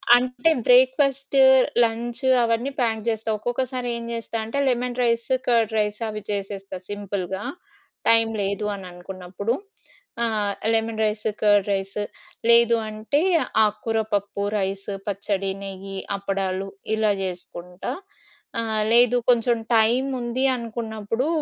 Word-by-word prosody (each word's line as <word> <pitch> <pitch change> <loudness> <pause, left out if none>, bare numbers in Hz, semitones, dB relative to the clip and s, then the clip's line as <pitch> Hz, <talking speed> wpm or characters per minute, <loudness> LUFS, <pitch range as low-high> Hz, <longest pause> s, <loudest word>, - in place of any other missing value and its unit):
అంటే 250 +4 +1 0.2
breakfast, 270 +2 +4 0.4
lunch 235 +2 -1 0.2
అవన్నీ 230 +4 0
pack 225 -2 +1
చేస్తా. 225 -1 -1
ఒక్కొక్కసారి 245 +2 -2
ఏం 235 - -6
చేస్తా 230 0 -6
అంటే 230 +5 -4
లెమన్ 250 0 0
రైస్, 235 -1 +1 0.2
కర్డ్ 230 -2 +2
రైస్ 210 0 0
అవి 215 -1 -5
చేసేస్తా 195 -1 -4
సింపుల్‌గా. 200 -2 -4 0.7
టైం 225 0 +5
లేదు 200 +1 -2
అని 195 -2 -9
అనుకున్నప్పుడు. 185 +4 -4 0.7
ఆ! - - +4 0.5
లెమన్ 225 0 0
రైస్, 210 0 -2 0.2
కర్డ్ 205 -1 +4
రైస్ 195 +1 -3 0.5
లేదు 235 0 +6
అంటే 215 +7 -1 0.4
ఆకుకూర 220 +1 -1
పప్పు, 200 0 -2 0.2
రైసు, 195 +1 -3
పచ్చడి, 195 -1 0
నెయ్యి, 195 0 -7 0.2
అప్పడాలు 195 -1 -2 0.3
ఇలా 215 -2 +2
చేసుకుంటా. 180 0 -6 0.7
ఆ! - - -3 0.3
లేదు. 245 +1 +5
కొంచెం 235 0 +2 0.2
టైం 230 +4 +4 0.2
ఉంది 240 +3 -1
అనుకున్నప్పుడు 225 +1 -3
220 Hz, 120 wpm, -23 LUFS, 200-240 Hz, 0.7 s, లేదు